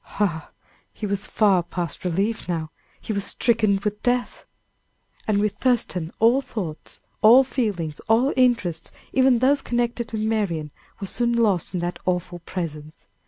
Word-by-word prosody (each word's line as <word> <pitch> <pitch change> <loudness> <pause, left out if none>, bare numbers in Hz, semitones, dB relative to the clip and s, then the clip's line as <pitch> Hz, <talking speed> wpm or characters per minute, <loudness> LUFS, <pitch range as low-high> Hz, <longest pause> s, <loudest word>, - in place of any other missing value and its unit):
Ah! 170 -7 0 0.4
he 215 - -6
was 200 -1 -2
far 200 -4 +3
past 170 -2 -5
relief 195 +4 -1
now; 160 -3 -2 0.3
he 220 - -4
was 200 -1 -1
stricken 220 -4 +2
with 210 0 -2
death. 245 0 -1 0.8
And 215 -2 +2
with 210 -1 +1
Thurston 190 -10 0
all 235 +5 +4
thoughts, 180 - -6 0.2
all 240 +5 +8
feelings, 200 - -2
all 240 +5 +3
interests, 235 -10 +1 0.2
even 260 -1 +4
those 270 +4 +3
connected 240 -1 -2
with 220 -1 -2
Marian, 195 -9 -1 0.3
were 200 - -4
soon 235 +5 0
lost 210 -6 +1
in 175 - -1
that 175 +1 -3
awful 180 -1 -1
presence. 160 -3 -6
210 Hz, 150 wpm, -23 LUFS, 175-235 Hz, 0.8 s, all